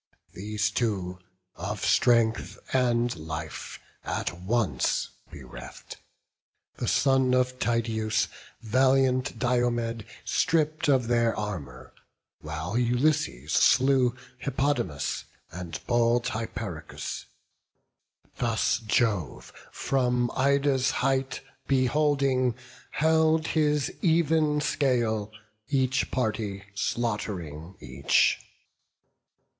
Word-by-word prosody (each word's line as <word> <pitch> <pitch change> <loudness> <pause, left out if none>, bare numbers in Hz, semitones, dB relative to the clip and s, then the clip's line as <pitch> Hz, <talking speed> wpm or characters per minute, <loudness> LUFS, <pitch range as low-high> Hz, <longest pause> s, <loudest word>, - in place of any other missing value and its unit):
These 105 +1 -2
two, 95 -6 -2 0.4
of 100 +2 -4
strength 115 -2 +2 0.2
and 120 -2 +2
life 80 -1 -6 0.2
at - - -2
once 95 - 0 0.2
bereft, - - -10 0.8
The - - -3
son 130 -2 +3
of 125 0 0
Tydeus, 110 -2 0 0.4
valiant 130 +2 +2
Diomed, 120 -2 0 0.2
Stripp'd 155 -3 +1
of 130 -4 +3
their 115 -1 +2
armour; 75 -12 -6 0.5
while 80 +8 -3
Ulysses 120 - +1
slew 130 -2 +4 0.2
Hippodamus, 135 - -1 0.3
and 85 -1 -6
bold 120 0 +2
Hyperochus. 100 -7 -5 1.1
Thus 115 -1 +1
Jove, 110 -6 -1 0.2
from 125 -2 0
Ida's 140 -1 +2 0.2
height 135 0 0 0.3
beholding, 135 -2 +2 0.3
held 160 +1 +2
His 150 -3 +1
even 160 -3 +2
scale, 115 -8 0 0.4
each 130 -2 +1
party 110 -5 -2
slaught'ring 95 -7 -3
each. 65 +2 +2
120 Hz, 80 wpm, -27 LUFS, 105-135 Hz, 1.1 s, slew